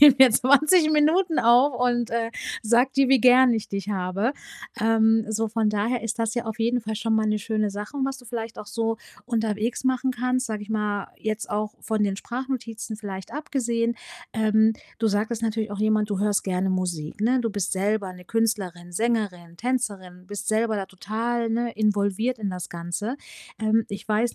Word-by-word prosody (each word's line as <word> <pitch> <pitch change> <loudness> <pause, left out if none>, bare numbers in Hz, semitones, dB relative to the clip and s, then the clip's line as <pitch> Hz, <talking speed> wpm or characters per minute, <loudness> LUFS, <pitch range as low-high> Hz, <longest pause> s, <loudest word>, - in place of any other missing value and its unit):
nehme 290 -2 +10
hier 265 -1 +9
20 305 +7 +5
Minuten 315 +3 +3
auf 245 +4 +5
und, 240 -1 +1
äh, 230 0 -1 0.3
sage 240 +4 +3
dir, 275 -1 +4
wie 265 -3 +5
gern 255 0 +6
ich 220 -2 -2
dich 200 +1 -4
habe.“ 195 +5 -1 0.5
Ähm, 225 0 +3
so, 220 +1 0
von 220 0 0
daher 215 +4 0
ist 230 +1 -3
das 225 -1 0
ja 240 - -2
auf 220 0 -4
jeden 235 +2 +1
Fall 220 -1 -4
schon 225 +1 0
mal 220 0 +2
'ne 215 0 +1
schöne 215 0 -1
Sache, 210 +8 -6
was 270 0 -1
du 255 - -15
vielleicht 230 -1 -6
auch - - -6
so 225 +1 -1 0.3
unterwegs 225 +1 -1
machen 260 0 +1
kannst, 255 +1 0
sage 215 -3 -4
ich 210 - -10
mal, 210 -2 -1
jetzt 215 0 -3
auch 210 0 -2
von 220 -1 0
den 200 -2 0
Sprachnotizen 235 -2 -5
vielleicht 195 -3 -7
abgesehen. 235 -6 -1 0.4
Ähm, 220 0 +3 0.3
du 225 - +1
sagtest 220 +2 0
natürlich 220 -1 -1
auch 205 - -5
jemand 215 -1 +2
du 200 -2 -1
hörst 205 0 +1
gerne 190 0 0
Musik, 180 -2 -3
ne? 250 +3 +3
Du 230 - 0
bist 205 -2 -2
selber 200 0 0
'ne 180 0 -13
Künstlerin, 195 -6 -1
Sängerin, 185 -5 -2
Tänzerin, 200 -8 -3
bist 205 +1 -6
selber 220 0 +1
da 195 -1 -3
total, 225 +5 -2
ne, 235 +1 -1
involviert 210 +3 0
in 210 -2 -2
das 180 -1 -5
Ganze. 175 +8 -4 0.4
Ähm, 220 0 +2
ich 200 +2 -7
weiß 220 +3 +1
220 Hz, 190 wpm, -25 LUFS, 205-240 Hz, 0.5 s, nehme